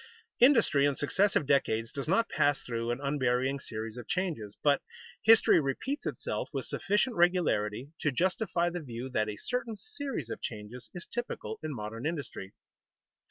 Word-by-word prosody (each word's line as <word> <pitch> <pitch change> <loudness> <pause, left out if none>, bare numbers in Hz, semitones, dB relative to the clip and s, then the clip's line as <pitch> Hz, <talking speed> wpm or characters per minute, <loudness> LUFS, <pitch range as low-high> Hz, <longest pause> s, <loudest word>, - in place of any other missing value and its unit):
_ - - -17 0.4
Industry 230 - +6
in 140 - 0
successive 190 +4 +2
decades 115 -5 +1
does 140 0 -5
not 195 +7 +3
pass 145 -1 +1
through 115 -1 -3
an 120 +2 -1
unvarying 135 -1 +1
series 110 -1 -6
of 120 - -8
changes, 155 - -2
but 145 -1 +4 0.4
history 225 -4 +7
repeats 260 - -2
itself - - -3
with - - -2
sufficient 210 +5 0
regularity 145 - +2
to 150 - +1
justify 175 - +1
the 175 - -3
view 125 -2 -6
that 110 -4 0
a 105 - -5
certain 235 - -2
series 275 - -5
of - - -5
changes 110 +3 -7
is 175 - -5
typical 240 -2 -4
in 155 - -4
modern 115 +1 -4
industry. 145 - -5
145 Hz, 160 wpm, -30 LUFS, 120-185 Hz, 0.4 s, history